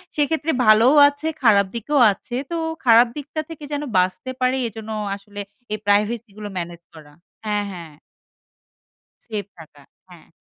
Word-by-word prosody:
সেক্ষেত্রে 310 +2 0
ভালোও 220 +6 +6
আছে, 290 +2 -6 0.2
খারাপ 205 -4 +5
দিকেও 275 +5 0
আছে। 240 +5 -9 0.2
তো - - -1 0.3
খারাপ 235 +1 +7
দিকটা 295 +2 -4
থেকে 315 -2 -9
যেন 290 0 -2
বাঁচতে 185 +8 0
পারি, 255 +1 +2
এজন্য 220 0 -10 0.3
আসলে 205 +1 -11 0.3
এই - - -1
প্রাইভেসিগুলো 210 0 0
ম্যানেজ 170 -1 -5
করা। 155 -2 -14 0.3
হ্যাঁ, 210 -1 -1
হ্যাঁ। 165 -3 -10 1.3
সেফ 210 -4 -4
থাকা। 155 -3 -15 0.3
হ্যাঁ। 175 -2 -16
215 Hz, 140 wpm, -21 LUFS, 200-260 Hz, 1.3 s, খারাপ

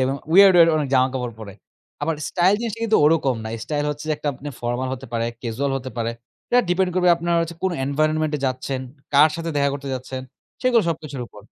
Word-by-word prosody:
দেখবেন 130 +2 +1 0.2
weird 195 0 +8
weird 165 -1 +7
অনেক 145 -3 -1
জামাকাপড় 130 -2 +1
পরে। 100 -2 -8 0.5
আবার 165 +1 0
স্টাইল 185 +3 +3
জিনিসটা 230 -1 -4
কিন্তু 220 -1 +3
ওরকম 150 -4 +3
না। - - -4 0.2
স্টাইল 145 -1 -2
হচ্ছে 150 +1 -6
যে - - +2
একটা 150 - -3
আপনি 140 +3 -8
ফরমাল 120 +2 -2
হতে 130 +1 -10
পারে, 115 0 0 0.2
ক্যাজুয়াল 130 +4 -2
হতে 130 0 -6
পারে। 115 0 -1 0.4
এটা 245 - +5
ডিপেন্ড 180 0 +2
করবে 180 -1 +3
আপনারা 170 0 0 0.3
কোন 190 - +1
এনভায়রনমেন্ট 155 +2 0
এ - - -7
যাচ্ছেন, 130 +1 -3 0.3
কার 150 +3 +7
সাথে 165 0 -4
দেখা 140 0 +3
করতে 140 -1 -6
যাচ্ছেন 130 0 -6 0.4
সেগুলো 245 -3 +4
সবকিছুর 150 -5 -4
উপর। 105 - -15
145 Hz, 205 wpm, -22 LUFS, 130-170 Hz, 0.5 s, weird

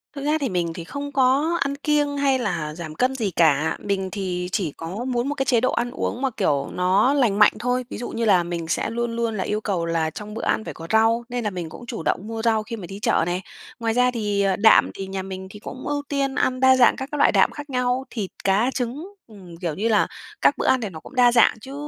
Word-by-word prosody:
Thực 280 - -5
ra 305 +1 +2
thì 270 - 0
mình 170 -3 -1
thì 170 -1 -7
không 285 +8 -6
có 275 +6 +2
ăn 280 0 0
kiêng 290 0 0
hay 270 -2 +2
là 170 -9 -2
giảm 160 -2 -7
cân 260 +6 +1
gì 215 -7 -1
cả, 160 -2 +2
mình 190 -2 -2
thì 180 -3 -3
chỉ 175 -8 -1
có 190 +9 -5
muốn 250 0 -1
một 290 - -2
cái 270 -1 -1
chế 235 -2 +3
độ 255 - +2
ăn 240 +1 -1
uống 255 -1 -3
mà, 270 - +1
kiểu, 140 -1 +1
nó 190 +8 +3
lành 235 -8 +2
mạnh 210 - +7
thôi. 250 +1 -1
Ví - - -6
dụ 240 - -5
như 230 0 -2
là 185 -5 +4
mình 170 -1 -4
sẽ 170 - -1
luôn 235 0 -2
luôn 230 -1 -1
là - - -1
yêu 210 +1 -2
cầu 185 -6 -1
là 165 -1 0
trong 210 +5 -8
bữa 225 - -5
ăn - - 0
phải - - -6
có 165 0 -9
rau 225 +2 +3
nên 245 -1 -3
là 210 - 0
mình 175 -4 -5
cũng 240 - -11
chủ 235 -8 -6
động 200 +6 -1
mua 225 0 -4
rau 220 -1 +2
khi 230 - -6
mà 205 -5 -8
đi 195 +1 -8
chợ 185 - +2
này, 175 +2 -2 0.4
ngoài 225 -1 0
ra 250 +1 +3
thì, 210 -4 -1
ờ, 195 -1 +2
đạm 220 +2 +5
thì 195 - -6
nhà 190 0 -4
mình 190 0 -7
thì 210 - -11
cũng 255 +4 -8
ưu 290 0 -1
tiên 275 -1 -1
ăn 255 -2 0
đa 260 0 +6
dạng 255 -2 +5
các 265 +1 -6
cái 295 - -3
loại - - +5
đạm - - +4
khác 295 0 -9
nhau 250 0 0
thịt, 205 -6 -4
cá, 210 +7 +2
trứng, 275 - -4
ừm, 185 -6 -13
kiểu 170 -3 -3
như 220 +4 -1
là 215 -2 +3 0.3
các - - +4
bữa - - -1
ăn 260 -2 +3
thì 210 - -3
nó 160 -3 -9
cũng 285 - -14
đa 245 -1 +5
dạng 235 -2 +5
chứ 270 +3 -9
225 Hz, 275 wpm, -23 LUFS, 185-255 Hz, 0.4 s, mạnh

